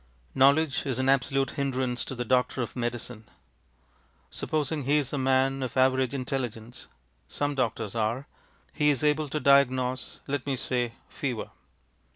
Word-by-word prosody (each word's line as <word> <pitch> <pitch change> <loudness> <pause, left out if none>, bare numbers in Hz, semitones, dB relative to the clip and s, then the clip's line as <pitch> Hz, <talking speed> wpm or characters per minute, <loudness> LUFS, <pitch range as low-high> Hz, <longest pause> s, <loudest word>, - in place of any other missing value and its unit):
Knowledge 140 +2 +3
is 130 -3 -1
an 130 0 +1
absolute 135 0 +2
hindrance 130 -3 -1
to 130 - -6
the 120 0 -3
doctor 125 +1 +1
of 115 - -7
medicine. 120 -2 -4 1.0
Supposing 150 -2 -2
he 145 +3 +3
is 140 -2 -1
a 145 - 0
man 135 +1 +2
of 130 0 -4
average 130 0 +3
intelligence 125 -3 -4 0.4
(some 145 0 -2
doctors 115 -5 -2
are), 115 +4 -1 0.5
he 150 -1 +2
is 140 -2 +1
able 150 0 +2
to 150 - -2
diagnose, 130 -2 +2
let 140 -1 -3
me 135 - +1
say, 125 -2 -1
fever. 125 -6 -4
130 Hz, 150 wpm, -27 LUFS, 125-140 Hz, 1.0 s, Knowledge